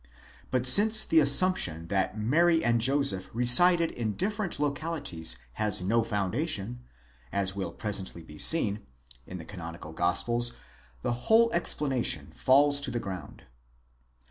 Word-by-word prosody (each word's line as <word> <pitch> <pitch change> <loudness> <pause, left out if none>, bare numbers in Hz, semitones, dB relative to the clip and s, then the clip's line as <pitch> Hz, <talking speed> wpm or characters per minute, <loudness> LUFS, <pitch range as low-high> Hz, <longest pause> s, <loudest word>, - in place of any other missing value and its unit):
But 130 -1 -2
since 215 - +6
the 165 - +2
assumption 140 - +2
that 95 +2 -2
Mary 165 +9 +1
and 120 -1 +1
Joseph 135 -7 0
resided 165 +9 +6
in 110 -4 -5
different 205 -3 -4
localities 145 - -2 0.2
has 105 -4 +2
no 115 +5 +1
foundation, 110 - -3 0.5
as 100 -1 -2
will 95 -4 -5
presently 95 -2 -5
be 75 -1 -14
seen, 110 -11 +2 0.5
in 90 - -8
the 80 - -11
canonical 85 -4 -10
Gospels, 120 +8 -1 0.5
the - - -1 0.2
whole 230 +1 +4
explanation 140 -7 -2
falls 140 +2 +2
to 140 - 0
the 120 -1 -4
ground. 95 -4 -9
120 Hz, 130 wpm, -27 LUFS, 95-155 Hz, 0.5 s, since